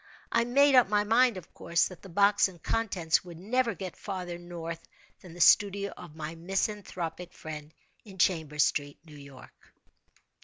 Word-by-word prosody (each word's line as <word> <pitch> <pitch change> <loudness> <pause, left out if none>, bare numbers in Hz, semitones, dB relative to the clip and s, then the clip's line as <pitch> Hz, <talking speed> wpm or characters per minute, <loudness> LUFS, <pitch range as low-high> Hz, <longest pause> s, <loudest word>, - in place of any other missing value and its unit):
I 235 0 +2
made 280 +4 +4
up 250 -6 +6
my 210 0 +2
mind, 230 +1 +3
of 180 - -11
course, 170 -1 +1
that 185 - -12
the 195 - -12
box 200 +3 +4
and 175 -4 -15
contents 185 -8 0
would 175 -2 -11
never 230 +4 0
get 185 0 -7
farther 180 -3 -6
north 170 -1 -7 0.4
than 175 -2 -13
the - - -11
studio 200 +3 +4
of 170 -4 -12
my 155 0 -6
misanthropic 180 -1 -3
friend, 150 -1 -8 0.3
in 195 -3 -13
Chambers 160 -5 +2
Street, 145 -1 -2
New 155 - -14
York. 140 -2 -15
180 Hz, 165 wpm, -29 LUFS, 165-205 Hz, 0.4 s, up